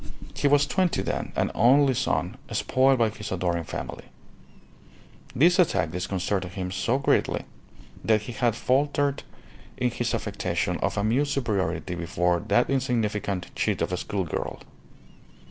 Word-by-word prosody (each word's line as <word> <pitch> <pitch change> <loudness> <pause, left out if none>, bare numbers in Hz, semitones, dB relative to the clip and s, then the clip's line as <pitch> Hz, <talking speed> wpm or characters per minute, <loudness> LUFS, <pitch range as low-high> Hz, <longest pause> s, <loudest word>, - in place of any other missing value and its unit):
He - - +1
was 145 0 +4
twenty 185 -2 0
then, - - -3
an - - 0
only 135 +4 +5
son, - - -1 0.2
spoiled 130 +1 +3
by 115 -2 +3
his 105 0 -8
adoring 85 -2 -1
family. - - -6 1.3
This 175 +7 +4
attack 155 - +2
disconcerted 90 +1 -2
him 90 -1 -4
so 115 +7 0
greatly 140 - +1 0.6
that 110 -2 +2
he 115 - -6
had 120 -1 +1
faltered 140 +2 +1 0.6
in 125 -1 0
his 120 0 -1
affectation 90 -4 -2
of - - -2
amused 125 +8 +1
superiority 100 -7 -1
before 90 0 0
that 115 +4 +3
insignificant 105 -8 -1
chit - - 0
of - - -1
a - - 0
school 95 +1 -2
girl. 85 - -4
110 Hz, 140 wpm, -26 LUFS, 90-135 Hz, 1.3 s, only